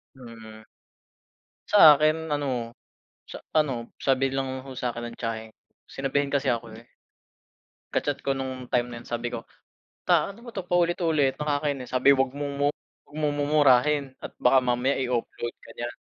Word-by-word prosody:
Hmm. 115 Hz, -3 st, -12 dB, 1.1 s
Sa 160 Hz, -8 st, +9 dB
akin, 155 Hz, +2 st, +1 dB
ano, 125 Hz, -5 st, -2 dB, 0.5 s
sa, -, -, -9 dB
ano, 135 Hz, -7 st, 0 dB
sabi 135 Hz, 0 st, +1 dB
lang 130 Hz, -1 st, -3 dB
ho 135 Hz, -, -10 dB
sa 120 Hz, -2 st, -2 dB
'kin 120 Hz, 0 st, -5 dB
ng -, -, -13 dB
tiyahin 110 Hz, -1 st, -4 dB
ko. -, -, -58 dB, 0.3 s
Sinabihin 140 Hz, +1 st, -1 dB
kasi 140 Hz, -1 st, 0 dB
ako, 115 Hz, -1 st, -2 dB
eh. 115 Hz, +1 st, -14 dB, 1.1 s
Ka-chat 145 Hz, -1 st, -1 dB
ko 135 Hz, -, +1 dB
no'ng 130 Hz, -2 st, -5 dB
time 125 Hz, 0 st, +2 dB
na 120 Hz, -, -8 dB
'yon 120 Hz, -, -14 dB
sabi 120 Hz, 0 st, -2 dB
ko, 120 Hz, -1 st, -6 dB, 0.6 s
"Ta, -, -, +3 dB
ano 200 Hz, -, -16 dB
ba 235 Hz, -, -10 dB
'to, 190 Hz, -, -3 dB
paulit-ulit, 170 Hz, -5 st, +1 dB
nakakainis." 145 Hz, -3 st, -2 dB
Sabi, 130 Hz, +2 st, +5 dB
"Huwag 135 Hz, -1 st, +1 dB
mo 145 Hz, +1 st, -4 dB
mong 145 Hz, +1 st, +1 dB
mu -, -, -58 dB, 0.2 s
huwag 145 Hz, -, -13 dB
mong 150 Hz, -1 st, 0 dB
mumurahin 145 Hz, -1 st, +4 dB, 0.2 s
at -, -, -6 dB
baka 130 Hz, +1 st, +4 dB
mamaya 125 Hz, +2 st, +1 dB
i-offload 120 Hz, -1 st, -3 dB
ka -, -, -14 dB
niyan." 120 Hz, 0 st, -5 dB
135 Hz, 170 wpm, -26 LUFS, 120-145 Hz, 1.1 s, Sa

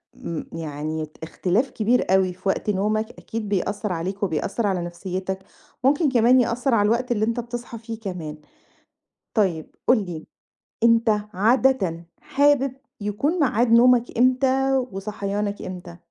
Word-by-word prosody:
آمم، 165 Hz, -2 st, -6 dB
يعني 155 Hz, 0 st, -4 dB, 0.2 s
اختلاف 190 Hz, -, 0 dB
كبير 235 Hz, +3 st, +1 dB
أوي 190 Hz, -1 st, +3 dB
في 185 Hz, +2 st, -3 dB
وقت 200 Hz, -, -1 dB
نومك، 215 Hz, +2 st, 0 dB
أكيد 220 Hz, -2 st, -6 dB
بيأثِّر 205 Hz, +1 st, -1 dB
عليك 185 Hz, +4 st, -4 dB
وبيأثّر 200 Hz, +5 st, -1 dB
على 185 Hz, -3 st, 0 dB
نفسيَّتَك، 185 Hz, +2 st, -4 dB, 0.4 s
ممكن 285 Hz, +3 st, +3 dB
كمان 245 Hz, +1 st, +5 dB
يأثّر 245 Hz, +2 st, 0 dB
على 205 Hz, -2 st, +4 dB
الوقت 245 Hz, +3 st, 0 dB
اللي 215 Hz, -2 st, +2 dB
أنتَ 230 Hz, +2 st, -1 dB
بتصحى 240 Hz, 0 st, -6 dB
فيه 225 Hz, 0 st, -7 dB
كمان. 175 Hz, -8 st, -6 dB, 1.0 s
طيب 180 Hz, -8 st, 0 dB
قُل 235 Hz, -5 st, +4 dB
لي، 165 Hz, -3 st, -7 dB, 0.6 s
أنتَ 230 Hz, 0 st, +4 dB, 0.3 s
عادةً 210 Hz, -5 st, +2 dB, 0.2 s
حابِب 280 Hz, -2 st, +2 dB, 0.3 s
يكون 275 Hz, -, -1 dB
ميعاد 240 Hz, -4 st, +2 dB
نومَك 240 Hz, 0 st, +5 dB
إمتى 260 Hz, +1 st, +3 dB, 0.2 s
وصحيانَك 205 Hz, +1 st, -3 dB
إمتى؟ 175 Hz, -2 st, -8 dB
210 Hz, 135 wpm, -23 LUFS, 185-245 Hz, 1.0 s, كمان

